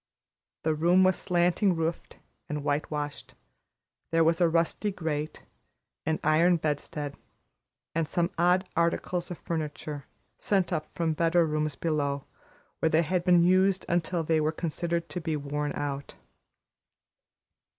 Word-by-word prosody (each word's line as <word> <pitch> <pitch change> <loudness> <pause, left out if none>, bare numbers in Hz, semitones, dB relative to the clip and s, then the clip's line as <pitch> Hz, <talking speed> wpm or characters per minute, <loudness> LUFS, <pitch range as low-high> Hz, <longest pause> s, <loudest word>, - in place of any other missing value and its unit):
The 160 - +2
room 175 +4 +4
was 185 -1 +4
slanting 180 +2 +2
roofed 165 +1 -3 0.3
and 150 -1 -3
whitewashed; 145 0 -3 0.7
there 165 0 +3
was 165 +2 +2
a 170 - +5
rusty 170 +5 +1
grate, 155 -5 -4 0.6
an 160 0 +1
iron 165 +3 +4
bedstead, 145 -1 -3 0.8
and 165 -1 -1
some 175 -1 0
odd 180 +2 +3
articles 170 +1 0
of 175 - -5
furniture, 150 -2 -5 0.3
sent 190 -3 +1
up 155 -2 -2
from 165 -2 0
better 165 +2 +3
rooms 155 -2 -1
below, 145 -3 -1 0.6
where 160 - +2
they 160 +1 +3
had 175 +2 0
been 175 -1 +5
used 185 +2 +3
until 175 0 0
they 160 0 +2
were 155 +1 +1
considered 170 +1 -2
to 180 - -4
be 160 -1 -1
worn 145 0 -2
out. 140 -1 -4
165 Hz, 135 wpm, -28 LUFS, 150-175 Hz, 0.8 s, a